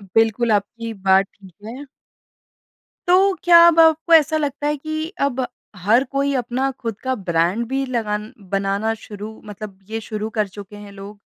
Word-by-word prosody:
बिल्कुल 225 +1 +2
आपकी 230 +2 -2
बात 195 -1 +3
ठीक 190 -3 -17
है। 250 +6 -8 1.2
तो, 380 +2 +5
क्या 345 -1 +7
अब 335 -1 +4
आपको 320 +1 +4
ऐसा 315 -1 +5
लगता 290 -1 -2
है 295 0 0
कि 310 +2 -4
अब 265 -2 0 0.3
हर 210 +7 +3
कोई 280 0 0
अपना 255 +2 -1
खुद 230 -4 -5
का 260 0 -1
ब्रांड 185 +2 0
भी 270 +2 -1
लगान 215 -4 -3 0.2
बनाना 200 +3 0
शुरू, 210 +1 -9
मतलब 205 -1 -9
ये 225 0 -3
शुरू 215 0 -5
कर 210 - +1
चुके 200 +1 -11
हैं 205 -1 -11
लोग? 200 +1 -11
225 Hz, 165 wpm, -20 LUFS, 205-280 Hz, 1.2 s, क्या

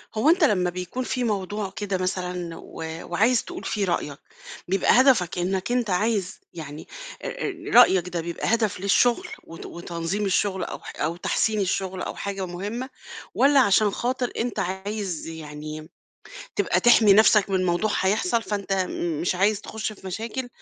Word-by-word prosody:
هو 220 +8 +3
أنت 345 0 +4
لما 185 -9 +3
بيكون 180 +8 -4
في 255 0 -2
موضوع 205 -2 -2
كده 200 -2 -2
مثلًا 180 -2 -3
و - - -9 0.3
وعايز 220 +7 +3
تقول 355 +1 -8
فيه 205 -2 -1
رأيَك، 150 -5 -2 0.5
بيبقى 195 +6 +4
هدفك 230 -11 +3
أنَّك 185 +4 -1
أنت 245 -3 +1
عايز 195 0 0
يعني 155 -2 -8 0.3
آآ 405 - -4 0.2
رأيَك 190 -7 +6
ده 170 -1 -2
بيبقى 170 +6 -2
هدف 220 -5 +1
للشغل 240 - +2 0.2
وت 165 - -10
وتنظيم 170 +4 -4
الشغل 195 0 +1
أو - - -5
ح - - -10
أو 160 +2 0
تحسين 215 +4 0
الشغل 190 0 -2
أو - - -4
حاجة 195 -1 -4
مهمَّة؟ 205 +9 -5 0.5
والّا 280 0 +5
علشان 210 -2 +4
خاطر 245 +3 -2
أنت 235 0 -2
عايز 190 -1 -3
يعني 155 -1 -8 0.7
تبقى - - +2
تِحمي 230 -4 +6
نفْسَك 210 -1 +5
من 185 -1 +1
موضوع 175 +5 +1
هيحصل 225 - +1
فأنت 200 -3 -3 0.5
مش 180 - +1
عايز 200 +3 +2
تخش 220 0 -5
في 195 - -13
مشاكل 230 +6 -4
195 Hz, 155 wpm, -24 LUFS, 180-225 Hz, 0.7 s, رأيَك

